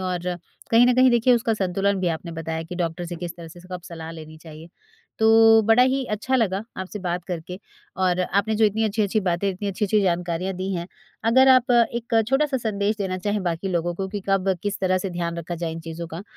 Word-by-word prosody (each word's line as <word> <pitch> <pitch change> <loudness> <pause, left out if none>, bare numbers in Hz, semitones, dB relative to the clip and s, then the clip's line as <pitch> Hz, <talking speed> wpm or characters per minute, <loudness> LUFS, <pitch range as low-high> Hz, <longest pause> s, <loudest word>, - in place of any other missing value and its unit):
और 180 -1 -3 0.4
कहीं 235 +2 +6
न 250 - +4
कहीं 255 0 +5
देखिए 240 +1 +4
उसका 230 -1 0
संतुलन 195 0 0
भी 180 - +1
आपने 165 +1 -4
बताया 160 0 -4
कि 170 +2 -8
डॉक्टर 175 0 -3
से 175 0 -6
किस 175 0 -6
तरह 165 -1 -10
से 175 +2 -13
स 180 - -16
कब 180 - -6
सलाह 165 -1 -8
लेनी 155 -1 -10
चाहिए, 160 0 -12 0.5
तो 225 0 +6
बड़ा 225 +3 +5
ही 260 +1 +1
अच्छा 240 +5 0
लगा 200 -4 0
आपसे 190 +3 -6
बात 180 -1 -3
करके। 180 0 -6 0.4
और 185 -1 +1
आपने 200 +4 0
जो 220 - +3
इतनी 215 +1 +1
अच्छी-अच्छी 215 0 0
बातें, 185 +1 0
इतनी 195 +2 -4
अच्छी-अच्छी 210 +2 +1
जानकारियाँ 180 0 -1
दी 190 +2 -3
हैं, 170 0 -4 0.4
अगर 260 +4 +5
आप 255 -1 +5
एक 235 -1 +2
छोटा-सा 275 +1 +1
संदेश 210 -3 -1
देना 185 -2 -2
चाहें 205 +2 -2
बाकी 175 +1 -2
लोगों 175 -1 -1
को 190 +2 -4
कि 205 +1 -5
कब 195 -1 +2
किस 205 -1 -2
तरह 185 -1 +2
से 190 0 -4
ध्यान 170 -1 -3
रखा 170 +1 -5
जाए 170 -1 -4
इन 165 - -6
चीज़ों 165 +1 -7
का, 165 +3 -7
190 Hz, 225 wpm, -23 LUFS, 175-220 Hz, 0.5 s, कहीं